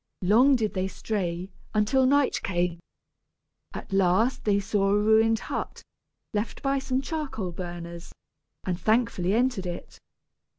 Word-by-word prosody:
Long 245 +9 +5
did 220 -4 -1
they 190 0 -1
stray, 185 -2 -3 0.2
until 255 +5 +3
night 285 0 +2
came. 175 -2 -1 1.0
At - - -7
last 195 +7 +2
they 200 -2 +3
saw 195 0 0
a 205 - +3
ruined 220 +1 +4
hut, - - -5 0.5
left 210 +2 -3
by 275 0 +1
some 265 -1 -1
charcoal 275 - -4
burners, 170 -1 -7 0.5
and 180 -2 -2
thankfully 215 -4 +1
entered 240 -6 +1
it. 175 - -7
210 Hz, 130 wpm, -26 LUFS, 185-250 Hz, 1.0 s, Long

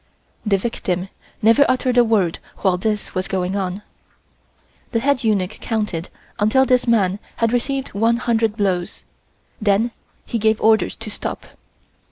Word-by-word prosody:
The 205 -3 +2
victim 190 -3 -2 0.3
never 230 +6 +6
uttered 255 -1 +1
a 245 - +7
word 205 -7 +1 0.2
while 190 -3 +3
this 210 +3 -2
was 185 0 -2
going 185 0 -1
on. 195 +1 -3 1.1
The 230 - +2
head 275 +1 +1
eunuch 205 -3 0
counted 210 -7 -2 0.3
until 215 +6 +4
this 255 -1 +2
man 200 -4 +2 0.2
had 230 0 +1
received 270 +2 -1
one 225 +3 +2
hundred 225 -2 0
blows, 185 -4 -1 0.6
then 210 +3 +2 0.3
he 230 - -2
gave 220 0 +2
orders 220 0 +3
to 225 -1 -7
stop. - - -5
220 Hz, 145 wpm, -20 LUFS, 195-235 Hz, 1.1 s, a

